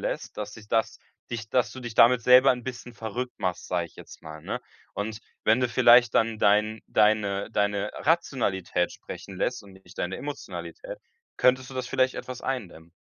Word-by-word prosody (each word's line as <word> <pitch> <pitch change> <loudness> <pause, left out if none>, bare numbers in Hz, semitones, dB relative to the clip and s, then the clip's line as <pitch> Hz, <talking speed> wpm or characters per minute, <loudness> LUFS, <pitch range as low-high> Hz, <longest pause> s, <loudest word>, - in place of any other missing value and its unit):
lässt, - - -4
dass 105 0 -5
sich 105 -1 -14
das 115 0 0 0.3
dich 110 -2 -5
dass 125 -2 +2
du 130 - -9
dich 120 -3 -7
damit 115 +1 +6
selber 125 +3 +7
'n 125 -1 -1
bisschen 120 -1 -7
verrückt 120 +3 -5
machst, 90 -2 -2
sage 85 -2 -1
ich - - -22
jetzt - - -13
mal, 80 0 -9
ne? - - -4 0.3
Und 110 +2 -4 0.2
wenn 110 +4 +4
du 125 - +2
vielleicht 120 -1 +6
dann 115 -1 +2
dein 105 +2 +3
deine 105 -1 +2
deine 105 -1 0
Rationalität 115 - 0
sprechen 95 -2 -10
lässt 125 +3 -1
und 100 -1 -15
nicht 95 -1 -17
deine 90 +2 -2
Emotionalität, - - -7 0.4
könntest 130 0 +3
du - - -10
das 130 -1 -3
vielleicht 130 0 +1
etwas 130 -1 -7
eindämmen. 95 -11 -5
115 Hz, 185 wpm, -26 LUFS, 100-125 Hz, 0.4 s, selber